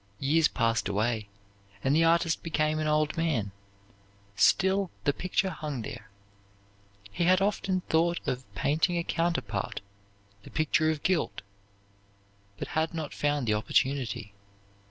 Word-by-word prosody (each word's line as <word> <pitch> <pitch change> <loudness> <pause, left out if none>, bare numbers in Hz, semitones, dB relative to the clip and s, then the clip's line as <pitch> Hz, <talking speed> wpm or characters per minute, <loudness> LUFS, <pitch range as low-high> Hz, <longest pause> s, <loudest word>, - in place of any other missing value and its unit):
Years 150 +3 +3
passed 115 -4 0
away, 105 +1 -1 0.5
and 135 +2 +3
the 165 - +4
artist 165 0 +2
became 155 -1 0
an 155 - -1
old 150 0 +1
man. 145 -12 0 0.8
Still 190 - +3
the 145 - +2
picture 185 +3 -1
hung 145 -9 -5
there. 110 0 -8 1.0
He 170 - 0
had 185 +1 +5
often 195 -2 0
thought 170 +1 +1
of 125 -4 -3
painting 155 - +1
a 170 - 0
counterpart, 130 - -1 0.6
the - - -13
picture 155 0 +2
of 155 -2 -2
guilt, 180 - 0 1.1
but - - -5
had 160 +1 -1
not 155 -3 -4
found 145 -2 0
the 110 - +2
opportunity. 115 -1 0
155 Hz, 135 wpm, -28 LUFS, 125-170 Hz, 1.1 s, had